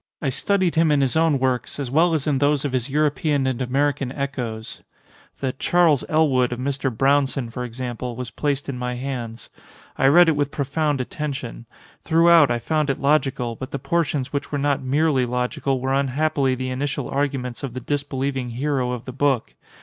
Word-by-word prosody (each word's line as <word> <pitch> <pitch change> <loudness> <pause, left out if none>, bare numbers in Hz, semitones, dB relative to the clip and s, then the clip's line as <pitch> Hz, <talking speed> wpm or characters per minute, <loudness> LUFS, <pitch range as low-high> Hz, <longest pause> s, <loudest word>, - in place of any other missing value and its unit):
I 145 - -1
studied 185 +6 +1
him 165 0 +3
in 145 -1 +3
his 135 0 +1
own 160 -3 +3
works 130 +1 -1
as 135 -4 -3
well 165 +3 +3
as 145 - -1
in 145 -4 +1
those 145 0 +2
of 145 - -1
his 130 0 -1
European 150 -1 +1
and 130 -1 -1
American 135 +1 0
echoes. 125 -6 -5 0.6
The 130 -2 -1
'Charles 165 -1 +3
Elwood' 135 -6 +3
of 120 - -3
Mr. 135 +1 -1
Brownson, 135 -1 +1
for 125 - -4
example, 125 0 -5
was 125 0 -6
placed 145 -1 -2
in 130 -3 -4
my 125 0 -3
hands. 120 -3 -5 0.5
I 135 - +4
read 175 +5 +7
it 160 - +3
with 145 -1 0
profound 145 0 -1
attention. 130 -4 -5 0.4
Throughout 165 -3 +5
I 120 - +1
found 150 +5 -1
it 135 - -1
logical, 135 -5 +1
but 130 +3 -7
the - - -3
portions 140 -1 -1
which 140 - -3
were 145 - -1
not 140 0 0
merely 135 -1 +1
logical 125 +2 -1
were 130 +1 -1
unhappily 140 0 +1
the 130 0 -4
initial 135 +2 -2
arguments 135 -3 -2
of 130 -3 -5
the - - -3
disbelieving 135 -2 -2
hero 130 0 -1
of 120 -2 -6
the 130 - -7
book. 135 -3 0
135 Hz, 190 wpm, -22 LUFS, 125-145 Hz, 0.6 s, read